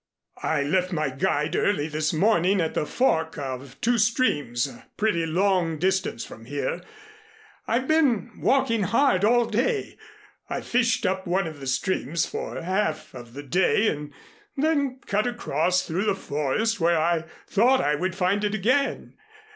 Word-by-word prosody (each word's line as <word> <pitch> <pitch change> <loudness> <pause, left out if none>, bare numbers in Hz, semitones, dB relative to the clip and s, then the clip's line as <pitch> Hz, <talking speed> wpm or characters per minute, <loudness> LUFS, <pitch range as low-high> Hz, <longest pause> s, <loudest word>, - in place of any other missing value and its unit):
I - - 0
left 180 +5 0
my 155 -5 -1
guide 145 +3 0
early 170 -8 +1
this 155 0 -1
morning 190 +2 +2
at 165 -2 0
the 150 - -1
fork 160 -11 +1
of 135 -1 -6
two 235 0 +2
streams 145 - +1
a 135 - -11
pretty 180 -6 +1
long 175 -1 +1
distance 190 -7 -1
from 115 - -12
here. 145 +3 -3 0.9
I've 255 +3 0
been 275 -8 +2
walking 235 -5 +2
hard 230 0 +2
all 240 +3 +4
day. 440 - -1 0.5
I - - -3
fished 235 -2 +1
up 190 0 -1
one 185 +2 +1
of 155 -3 -7
the 135 - -7
streams 160 +3 0
for - - -5
half 185 -3 -1
of 120 -1 -11
the 145 - -7
day 190 - +2
and 150 0 -5 0.5
then 280 -3 +1
cut 210 +3 0
across 185 - 0
through 180 +5 -2
the 205 - +2
forest 195 +8 -1
where 170 0 +3
I 165 0 +1 0.2
thought 245 +6 +3
I 145 - +1
would 185 +5 -2
find 195 +2 +1
it 210 0 0
again. 255 +8 0
185 Hz, 160 wpm, -25 LUFS, 150-225 Hz, 0.9 s, all